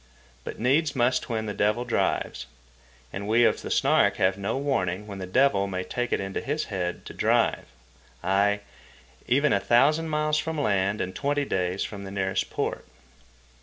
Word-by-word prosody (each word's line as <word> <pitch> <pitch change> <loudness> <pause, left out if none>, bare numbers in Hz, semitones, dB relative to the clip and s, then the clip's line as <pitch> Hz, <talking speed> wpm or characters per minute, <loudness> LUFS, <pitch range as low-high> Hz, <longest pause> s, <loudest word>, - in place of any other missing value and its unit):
But - - -7
needs 145 +6 +1
must 130 +1 +1
when 110 -2 -2
the 105 - -3
devil 105 +5 +1
drives, 120 - -1 0.7
and 100 +1 -5
we 115 +2 +4
of - - +2
the - - -6
Snark - - +3
have 95 0 +2
no 100 +5 -2
warning 105 -9 -1
when 100 -2 -8
the 95 - -5
devil 100 -2 +3
may 95 -1 -3
take 120 +6 -3
it - - +1
into 95 0 -3
his 150 +3 -2
head 90 -2 -3
to - - -8
drive, - - +1 0.6
ay, 100 +3 +2 0.7
even 140 +3 +3
a 100 - +3
thousand 150 +9 +3
miles 150 0 +1
from 160 -1 -3
land 100 -4 +1
and 95 - -4
twenty 145 0 0
days 90 -4 -1
from 100 -2 -6
the 95 - -7
nearest 95 -1 -1
port. - - -3
105 Hz, 175 wpm, -26 LUFS, 95-140 Hz, 0.7 s, we